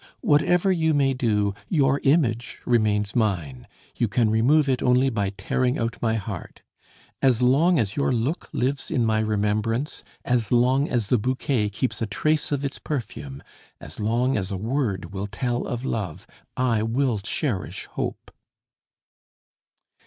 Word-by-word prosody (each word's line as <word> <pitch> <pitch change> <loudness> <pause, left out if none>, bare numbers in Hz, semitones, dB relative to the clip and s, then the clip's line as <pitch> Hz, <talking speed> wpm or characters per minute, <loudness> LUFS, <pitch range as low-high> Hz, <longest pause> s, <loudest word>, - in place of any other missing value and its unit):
"Whatever 175 +6 +3
you 160 -3 +2
may 135 -2 +3
do, 105 -6 +1 0.2
your 140 -4 +2
image 130 -5 +1
remains 105 -4 +1
mine; 85 - -1 0.3
you 120 - +2
can 110 +1 +1
remove 140 +7 +3
it 130 -2 +1
only 125 +1 +3
by 100 -4 0
tearing 125 +5 -1
out 115 0 -3
my 115 -1 +1
heart. 105 - -6 0.6
As 125 -3 +3
long 155 +8 +4
as 105 -6 0
your 140 - +1
look 125 +7 -1
lives 135 +2 -1
in 120 - +1
my 110 -1 +2
remembrance, 110 +5 -1 0.2
as 120 -4 0
long 130 +4 +3
as 120 -4 0
the 120 +3 +2
bouquet 130 -2 0
keeps 120 +6 -3
a 115 - 0
trace 155 +10 0
of 145 -1 -1
its 140 - -4
perfume, 75 - -5 0.4
as - - -10
long 120 +5 +1
as 95 -2 -2
a 95 - -2
word 110 -3 -2
will 100 +1 -3
tell 120 +3 -2
of 120 +1 -4
love, 100 - -3 0.3
I 120 -4 +2
will 115 0 0
cherish 100 - -3
hope." - - -5
120 Hz, 155 wpm, -24 LUFS, 105-135 Hz, 0.6 s, long